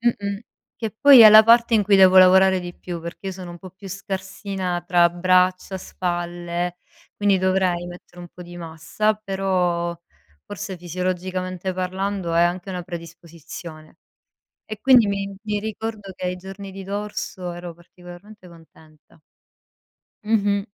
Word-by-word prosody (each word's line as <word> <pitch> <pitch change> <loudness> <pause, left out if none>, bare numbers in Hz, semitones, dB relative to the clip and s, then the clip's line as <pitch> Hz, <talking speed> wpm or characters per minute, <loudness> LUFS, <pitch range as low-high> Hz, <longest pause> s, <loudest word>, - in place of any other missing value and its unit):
E 240 0 +2
mh-mh. 200 0 -4 0.4
Che 225 -2 -4
poi 280 -3 +8
è 220 - +11
la 215 +1 +10
parte 235 +1 +5
in 210 - +4
cui 200 0 +2
devo 190 0 +7
lavorare 190 +1 +6
di 175 0 -8
più, 175 -2 -7
perché 170 +3 -9
io - - -4
sono 185 -1 -9
un 175 - -11
po' 185 +1 -11
più 190 +2 -14
scarsina 190 -1 -5
tra 175 -1 +4
braccia, 185 +1 +1
spalle, 175 -1 -4 0.4
quindi 200 -2 +2
dovrei 185 -2 0
mettere 175 0 -12
un 175 - -10
po' 180 - -17
di 175 0 -11
massa, 170 +6 -2
però 185 -4 -1 0.5
forse 205 -1 -7
fisiologicamente 185 +1 -4
parlando 185 -1 -3
è 170 - +4
anche 175 +2 -1
una 180 -1 -5
predisposizione. 170 -2 -11 0.7
E 215 -1 -8
quindi 250 -5 +6
mi 200 0 -3
mi 210 -1 -2
ricordo 215 -1 -6
che 185 - -6
ai 180 - -3
giorni 195 +2 -10
di 195 0 -9
dorso 200 -2 -5
ero 175 0 -8
particolarmente 175 +3 -15
contenta. 160 -2 -20 1.1
Mh-mh. 205 -2 +1
185 Hz, 150 wpm, -22 LUFS, 175-200 Hz, 1.1 s, è